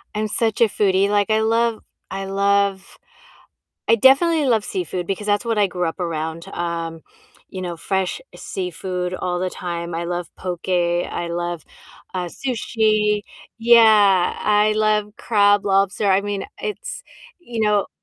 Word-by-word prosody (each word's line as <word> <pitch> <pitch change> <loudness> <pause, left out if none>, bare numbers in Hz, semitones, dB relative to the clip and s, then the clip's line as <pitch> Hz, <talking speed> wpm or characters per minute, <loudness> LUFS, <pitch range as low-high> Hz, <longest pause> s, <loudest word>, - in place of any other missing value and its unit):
I'm 215 0 -1
such 220 0 0
a - - +8
foodie, 200 -1 +2
like, 205 0 +1
I 220 0 +3
love 230 0 +1 0.3
I 195 0 -4
love 200 0 0 0.9
I - - +7
definitely 290 +7 +4
love 225 -4 +2
seafood 180 -1 -3
because 195 +2 -3
that's 205 +1 +1
what 225 -2 0
I 205 - +4
grew 180 -1 -3
up 165 - -4
around, 165 -1 -3
um, 165 -1 -4 0.5
you 185 -1 -7
know, 175 -1 -4
fresh 190 - -2 0.2
seafood 180 0 -4
all 180 -1 -2
the 185 +1 -1
time. 170 -1 -5
I 170 +1 -3
love 175 0 -3
poke, 180 0 -6
I 175 -1 0
love, 175 -1 -3 0.5
uh, 180 -1 -2
sushi 215 -2 0 0.4
yeah, 215 -5 +5
I 210 0 +3
love 215 -1 +1
crab, 205 -2 +3
lobster 195 +1 +2
I 190 +1 +4
mean, 205 -1 -3 0.2
it's, 435 +4 -5 0.4
you 240 -10 -6
know 210 -1 +2
195 Hz, 150 wpm, -21 LUFS, 180-215 Hz, 0.9 s, a